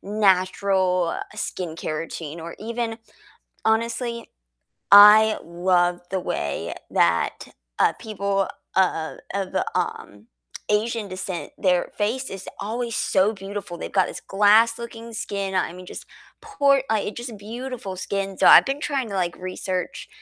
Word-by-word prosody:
natural 185 -3 +1 0.2
skincare 160 -3 -4
routine 165 -1 -6
or 170 +1 -7
even 230 0 -3 0.7
honestly, 235 +1 -1 0.6
I 210 +2 +9
love 175 0 +1
the 190 - 0
way 70 - -3 0.2
that, 85 0 +1 0.3
uh, - - +4
people 200 -2 -1 0.3
of 170 -4 +1
of, 195 -1 -3 0.2
um, 105 +2 -4 0.4
Asian 215 +1 0
descent, 185 -1 -5
their 180 -3 +1
face 235 +6 -1
is 195 0 -8
always 230 +2 -3
so 195 +3 +2
beautiful, 195 -3 -7
they've - - -6
got 190 -2 +3
this - - -7
glass-looking 230 +3 +2
skin. 200 -3 -3
I 185 - 0
mean, 180 0 -11
just - - -8 0.3
por 280 -11 +2
uh, 220 - +3
it's 205 - -5
just 240 -3 -7
beautiful 230 -1 -6
skin, 195 +1 -3
so - - +5
I've - - +9
been 275 +2 -2
trying 275 -6 -2
to, - - -5
like, 175 -2 -1
research, 185 0 -4
200 Hz, 135 wpm, -23 LUFS, 185-225 Hz, 0.7 s, I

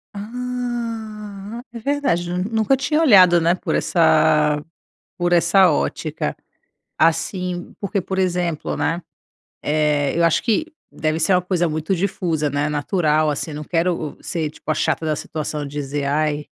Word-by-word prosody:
Hum. 230 -2 -5
É 235 - -6
verdade, 260 -9 0
nu 180 +1 -1
nunca 225 +4 +2
tinha 300 +4 +1
olhado, 185 - +7
né, 170 +2 +3
por - - -3
essa 150 -3 +3 0.6
por 175 0 0
essa 175 +2 +5
ótica. 150 - -2 0.6
Assim, 175 +2 0
porque, 200 0 -1
por 190 +1 -4
exemplo, 175 -4 -1
né, 170 +3 -1 0.6
eh, 150 -1 +1
eu 170 - +3
acho 170 - +3
que 245 +7 +1 0.3
deve 155 +1 -1
ser 165 +4 +2
uma 180 - +3
coisa 175 -1 0
muito 160 +4 -1
difusa, 170 -4 -1
né, 145 +2 0
natural, 155 0 +1
assim. 150 +2 -3
Não 150 +1 -6
quero 165 -2 -1
o - - -22
ser, 160 -3 -2
tipo, 155 - -8
a - - +3
chata 160 - 0
da 155 -1 0
situação, 150 0 -4
dizer: 145 0 -3
"Ai, 150 +1 0
175 Hz, 150 wpm, -21 LUFS, 155-200 Hz, 0.6 s, olhado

